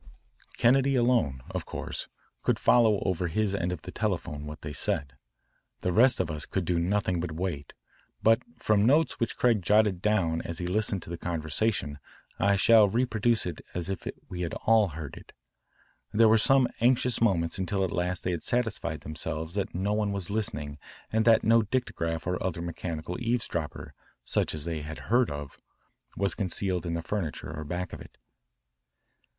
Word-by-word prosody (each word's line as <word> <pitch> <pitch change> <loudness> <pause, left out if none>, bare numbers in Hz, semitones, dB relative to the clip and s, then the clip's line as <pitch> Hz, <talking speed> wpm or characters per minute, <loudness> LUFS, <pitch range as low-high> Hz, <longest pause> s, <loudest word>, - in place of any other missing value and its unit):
Kennedy 135 +3 +4
alone, 120 - +2
of - - -4
course, - - -5 0.3
could - - +1
follow 110 -4 +4
over 90 -1 0
his 100 +4 0
end 90 -2 -1
of 90 -4 -5
the 90 - -7
telephone 85 -9 -3
what 75 0 -8
they 75 0 -6
said. 70 -1 -1 0.7
The 90 - 0
rest 125 +6 +5
of 85 -3 0
us 75 -1 -4
could 95 -2 -2
do 85 0 +1
nothing 95 0 0
but 85 -1 -3
wait, 80 -4 -4 0.5
but 115 +2 +5 0.2
from 105 -2 +2
notes 150 +5 +3
which 115 - -1
Craig 115 -4 +3
jotted 105 0 +3
down 90 -6 +1
as 85 - -5
he 90 - -3
listened 100 0 0
to - - -9
the 85 - -5
conversation 80 -1 -1 0.4
I 100 +1 +3
shall 110 +1 +6
reproduce 115 +1 +1
it 90 - -5
as 90 +2 -2
if 95 - -5 0.2
we 90 -1 -6
had 85 - -3
all 110 -2 +5
heard 80 -4 -7
it. - - -14 0.8
There 115 +1 +5
were 110 0 +5
some 135 +2 +5
anxious 125 0 +2
moments 85 -7 +1
until 95 +1 0
at 95 - -1
last 90 0 -1
they 90 - 0
had 85 -3 -2
satisfied 120 -2 -1
themselves 80 +2 -4
that 100 -3 -2
no 100 +3 0
one 105 -1 0
was 100 -2 -3
listening 75 -9 -3 0.3
and 110 0 +2
that 115 -1 +5
no 115 +1 +5
dictograph 90 -8 -2
or 90 +1 -2
other 85 -2 -2
mechanical 85 +4 -5
eavesdropper, 115 -10 -2 0.3
such - - 0
as 75 0 -3
they 80 -2 -3
had 80 +7 -8
heard 125 -1 +4
of, 70 -1 -7 0.6
was 100 0 +1
concealed 95 -2 -2
in 85 - -1
the 85 - -3
furniture 80 -5 -4
or 75 - -5
back 90 +3 -4
of - - -7
it. - - -14
95 Hz, 180 wpm, -28 LUFS, 85-110 Hz, 0.8 s, shall